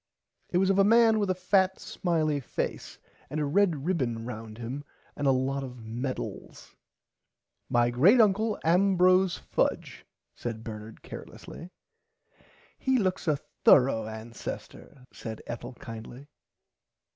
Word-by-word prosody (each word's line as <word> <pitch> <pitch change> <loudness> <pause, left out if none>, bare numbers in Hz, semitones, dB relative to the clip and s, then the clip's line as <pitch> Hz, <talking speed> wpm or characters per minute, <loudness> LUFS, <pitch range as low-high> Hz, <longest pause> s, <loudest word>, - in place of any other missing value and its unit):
It 175 - 0
was 190 +1 +3
of 195 - +2
a - - +7
man 225 +1 +5
with 205 -2 0
a 185 - +2
fat 190 +1 +2
smiley 155 -5 -1
face 130 - -4 0.3
and 155 - -3
a 150 - 0
red 160 -2 +2
ribbon 125 -11 -1
round 110 -2 -7
him 125 +5 -5 0.3
and 145 - -1
a - - +6
lot 135 +1 0
[Pg 130 -2 -7
39] - - -14
of 115 - -12
medals. 125 +4 -6 0.9
My 120 0 +3
great 175 - +5
uncle 215 0 +3
Ambrose 185 +1 +4
Fudge - - -2 0.3
said 115 -2 -6
Bernard 110 0 -9
carelessly. 170 - -10 1.1
He 265 -1 +2
looks 185 -5 -1
a 150 -2 +3 0.3
thourough 125 -5 +5
ancester 115 +4 -8
said 110 -1 -7
Ethel 120 +1 -6
kindly. 115 +3 -9
145 Hz, 135 wpm, -28 LUFS, 120-185 Hz, 1.1 s, a